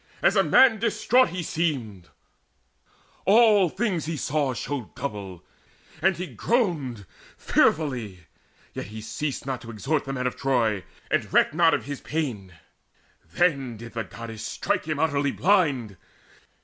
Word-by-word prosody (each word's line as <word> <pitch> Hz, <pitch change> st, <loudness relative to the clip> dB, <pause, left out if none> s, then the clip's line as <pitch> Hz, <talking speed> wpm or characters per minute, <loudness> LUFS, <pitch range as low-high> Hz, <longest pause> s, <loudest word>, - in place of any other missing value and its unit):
As -, -, +4 dB
a -, -, +5 dB
man 240 Hz, -5 st, +5 dB
distraught 235 Hz, +1 st, +3 dB
he 180 Hz, 0 st, -4 dB
seemed: 125 Hz, -, -3 dB, 1.2 s
All 210 Hz, -3 st, +5 dB
things 185 Hz, -6 st, -1 dB
he 165 Hz, -1 st, -3 dB
saw 140 Hz, -2 st, -1 dB
showed 135 Hz, -2 st, -5 dB
double, 100 Hz, -9 st, -6 dB, 0.6 s
and 190 Hz, -1 st, +3 dB
he 180 Hz, -, -3 dB
groaned 165 Hz, -, -1 dB, 0.3 s
Fearfully; 120 Hz, -, 0 dB, 0.5 s
yet -, -, -6 dB
he 110 Hz, +2 st, -8 dB
ceased 135 Hz, +6 st, -4 dB
not 130 Hz, -3 st, -3 dB
to 115 Hz, -, -10 dB
exhort 135 Hz, +7 st, -1 dB
The 135 Hz, -, -4 dB
men 130 Hz, -1 st, -3 dB
of 125 Hz, -, -1 dB
Troy, 115 Hz, -8 st, 0 dB, 0.3 s
and -, -, 0 dB
recked -, -, +4 dB
not 165 Hz, 0 st, +4 dB
of -, -, -5 dB
his 140 Hz, -1 st, -6 dB
pain. 125 Hz, -, -3 dB, 0.8 s
Then 135 Hz, -, +1 dB
did 115 Hz, +1 st, -10 dB
the 115 Hz, -1 st, -2 dB
Goddess 115 Hz, -2 st, -8 dB
strike -, -, -2 dB
him 155 Hz, -2 st, -2 dB
utterly 145 Hz, -2 st, +1 dB
blind. 145 Hz, -, +1 dB
140 Hz, 145 wpm, -25 LUFS, 115-170 Hz, 1.2 s, a